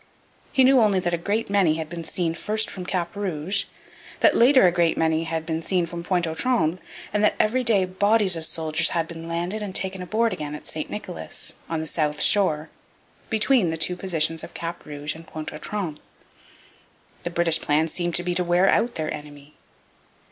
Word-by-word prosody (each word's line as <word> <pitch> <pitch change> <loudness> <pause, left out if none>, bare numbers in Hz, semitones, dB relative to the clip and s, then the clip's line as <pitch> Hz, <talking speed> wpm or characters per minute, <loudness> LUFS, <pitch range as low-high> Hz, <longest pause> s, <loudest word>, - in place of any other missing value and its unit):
He 265 - +4
knew 260 0 +6
only 205 -3 +3
that 175 -1 -1
a - - +2
great 210 +6 -1
many 195 -6 +3
had 160 -1 -4
been 170 +1 -6
seen 165 0 -2
first 215 +5 -1
from 180 -2 -7
Cap 175 -1 -2
Rouge, 195 0 -1 0.6
that - - +5
later 255 -1 +6
a 180 - +5
great 170 -1 +2
many 160 0 +1
had 160 0 -3
been 160 0 -2
seen 180 0 0
from 170 0 -6
Pointe 175 -1 +1
aux 160 - -3
Trembles, 175 -5 +1 0.3
and 210 0 +1
that 210 - +4
every 255 +4 +2
day 210 -5 +3
bodies 200 +1 +3
of 165 - -5
soldiers 160 0 +1
had 165 -1 -1
been 165 0 -8
landed 175 +5 -3
and 200 -2 -5
taken 190 0 -2
on 180 - -6
board 230 +3 +1
again 150 -1 -5
at - - -10
St 155 - -4
Nicholas, 185 -4 -5 0.2
on 165 -1 -1
the - - -4
south 150 -2 -1
shore, 160 -7 +2 0.6
between 220 -3 +3
the 160 - -2
two 180 +3 +1
positions 165 -3 0
of - - -10
Cap 170 -1 -6
Rouge 150 0 -4
and 160 0 -13
Pointe 155 -1 -6
aux 150 - -7
Trembles. 180 -8 -4 1.2
The - - -3
British 170 -2 +1
plan 150 +2 +2
seemed 175 +1 -2
to 175 - +2
be 175 0 -1
to 180 - 0
wear 175 +2 +3
out 235 +1 +2
their 155 -1 -2
enemy. 145 0 -10
175 Hz, 205 wpm, -24 LUFS, 160-200 Hz, 1.2 s, knew